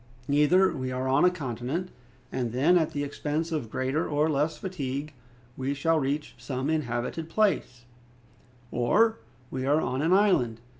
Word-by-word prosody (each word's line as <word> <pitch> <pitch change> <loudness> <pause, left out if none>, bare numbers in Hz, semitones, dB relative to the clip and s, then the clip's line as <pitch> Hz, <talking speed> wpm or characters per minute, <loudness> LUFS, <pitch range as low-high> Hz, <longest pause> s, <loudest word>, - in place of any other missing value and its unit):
Either 150 +7 +4
we 130 -2 -3
are 130 +1 -2
on 135 +2 +3
a 180 - +7
continent, 150 +2 -4 0.4
and 120 -3 -2
then, 145 +8 +4
at 160 -3 +3
the 145 - -3
expense 150 +3 -3
of 145 -9 -2
greater 130 +6 -1
or 150 +1 +2
less 150 +2 0
fatigue, 150 -6 -4 0.4
we 135 +2 -2
shall 160 +3 +2
reach 145 +2 -2
some 130 +3 -2
inhabited 150 +2 -2
place, 165 - 0 0.9
or 220 - +3 0.3
we 130 0 -3
are 145 +3 +3
on 130 -3 -1
an 160 +3 +1
island. 185 - +3
145 Hz, 155 wpm, -27 LUFS, 130-165 Hz, 0.9 s, a